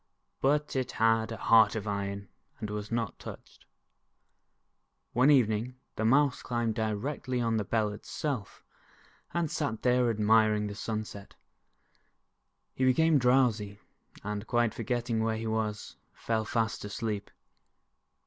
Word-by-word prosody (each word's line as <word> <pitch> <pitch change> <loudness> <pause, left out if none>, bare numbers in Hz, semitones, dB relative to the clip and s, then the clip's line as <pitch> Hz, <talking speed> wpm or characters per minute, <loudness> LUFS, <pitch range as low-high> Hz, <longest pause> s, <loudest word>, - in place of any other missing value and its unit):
But 145 +2 +1
it 130 -1 -1
had 115 0 +2
a 115 - -4
heart 115 0 +5
of 110 -1 -4
iron 100 -1 -3 0.3
and 105 -1 -4
was 105 +1 -5
not 115 -3 -2
touched. - - -11 1.5
One 125 +4 +4
evening, 120 -3 +3 0.2
the 110 - -2
Mouse 135 +3 +3
climbed 120 -2 -1
directly 115 +4 -2
on 115 -2 +1
the 105 - 0
Bell 110 0 0
itself, 120 - -5 0.7
and 170 -3 -1
sat 110 0 -2
there 125 -1 +3
admiring 110 -1 +3
the 105 - -4
sunset. 105 -1 -5 1.4
He 130 - -2
became 155 +4 +4
drowsy, 120 -5 +2 0.4
and 105 +1 -4
quite 120 -2 +2
forgetting 115 -1 -1
where 110 0 0
he 115 - -5
was, 110 -1 -3 0.2
fell 110 -1 -2
fast 110 -1 -1
asleep. 105 0 -4
110 Hz, 130 wpm, -30 LUFS, 105-125 Hz, 1.5 s, heart